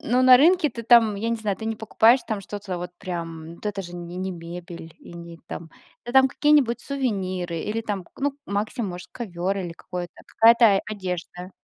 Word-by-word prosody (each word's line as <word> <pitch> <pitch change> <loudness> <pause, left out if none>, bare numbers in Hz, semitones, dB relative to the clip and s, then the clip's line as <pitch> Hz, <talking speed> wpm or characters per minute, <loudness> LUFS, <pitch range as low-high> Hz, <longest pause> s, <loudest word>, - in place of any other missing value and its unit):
Ну, 250 +2 +1
на 255 -1 +9
рынке 330 +4 +4
ты 230 -3 -7
там, 230 -2 +5
я 220 +3 -3
не 230 - 0
знаю, 210 -4 -2
ты 220 - -8
не 225 0 -2
покупаешь 225 +3 +4
там 215 -3 -2
что-то 200 -1 -6
вот 175 0 -6
прям, 165 -3 -6
вот 190 - -9
это 200 -1 -3
же 175 -1 -10
не 175 0 -7
не 185 +1 -3
мебель, 170 -1 -9
и - - -14
не 170 -1 -10
там, 165 -1 -8 0.3
это 240 - -6
там 265 0 +7
какие-нибудь 280 -5 +3
сувениры 185 -11 -2
или 215 +5 -2
там, 205 -4 -4
к - - -25
ну, 285 0 +1
максимум 205 +1 -2
может, 180 0 -9
ковер 195 -4 -3
или 175 -3 -4
какое-то, 180 0 -7
какая-то 225 -3 +5
одежда. 180 -2 -5
200 Hz, 200 wpm, -24 LUFS, 175-230 Hz, 0.3 s, на